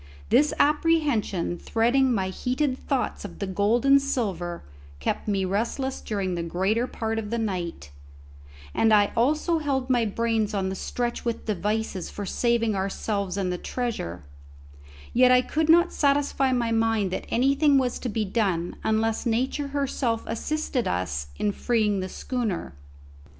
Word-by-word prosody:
This 295 +1 +4
apprehension 290 - +1
threading 250 +4 +2
my 190 -5 0
heated 255 +7 -1
thoughts 265 -1 -2
of - - -8
the 200 - -3
gold 205 +6 +1
and 275 0 +6
silver 190 -11 -2 0.4
kept 70 - -2
me 195 -2 +1
restless 235 +7 -2
during 195 -4 -2
the 170 - -2
greater 190 +8 0
part 225 -2 -2
of 210 -2 -5
the 235 - -1
night, 180 - -3 0.8
and 225 - +3
I 205 -1 +5
also 305 +7 +2
held 265 -3 -1
my 240 -2 +3
brains 220 0 0
on 190 -1 0
the 190 - -3
stretch 240 +5 -3
with 235 -1 -3
devices 210 -2 -2
for 205 - -6
saving 230 +1 +1
ourselves 195 0 -2
and 185 -2 -1
the 180 - -4
treasure; 215 - -4 0.9
yet 250 +1 +6
I 250 0 +5
could 315 +4 -1
not 345 +2 +5
satisfy 280 -2 +2
my 240 -2 0
mind 225 -4 +1
that - - -3
anything 275 +4 +3
was 255 -2 0
to 250 - -3
be 215 0 -1
done 190 -5 -1
unless 220 +2 0
Nature 260 +5 0
herself 275 -5 -1
assisted 265 +2 -2
us 75 -6 -2
in 210 - +1
freeing 215 -2 +1
the 185 0 -4
schooner. 230 -8 -3
225 Hz, 155 wpm, -25 LUFS, 200-260 Hz, 0.9 s, and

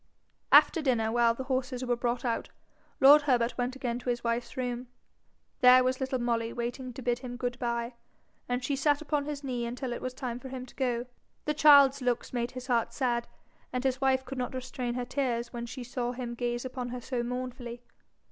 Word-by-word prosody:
After 330 - +7
dinner, 235 -6 +1
while 235 0 +3
the 260 - -4
horses 255 -1 -2
were 245 -1 +1
brought 240 +1 -2
out, 235 -1 -1 0.5
lord 290 +1 +9
Herbert 245 -4 +1
went 250 +1 -2
again 245 -3 -2
to 250 - -5
his 240 -1 -1
wife's 235 +2 -2
room. 245 -1 -3 0.7
There 255 0 +8
was 255 0 0
little 265 -1 -1
Molly 235 -1 -1
waiting 245 +2 -4
to 260 - -8
bid 240 0 0
him 245 -1 -6
good 245 -1 -3
bye, 235 0 -2 0.6
and 245 +1 -1
she 280 - 0
sat 290 +2 +2
upon 295 -1 -1
his 290 -1 -5
knee 250 -3 -2
until 245 +1 -3
it - - -6
was 255 0 -4
time 245 -3 -4
for 265 - -9
him 255 -1 -6
to 250 - -16
go. 245 -2 -1 0.4
The 300 - +1
child's 280 -2 +7
looks 245 -1 -1
made 240 -1 -1
his 255 0 -8
heart 240 -3 +1
sad, 240 -3 0 0.4
and 250 0 -2
his 265 0 0
wife 265 -1 +2
could 260 0 -6
not 250 +1 -3
restrain 250 -1 -4
her 250 -1 -2
tears 245 -3 -2
when 235 0 -5
she 250 +2 -7
saw 245 0 -3
him 245 -1 -5
gaze 240 +1 -2
upon 250 -1 -4
her 250 +1 -5
so 245 0 -3
mournfully. 245 -1 -5
250 Hz, 210 wpm, -29 LUFS, 240-260 Hz, 0.7 s, lord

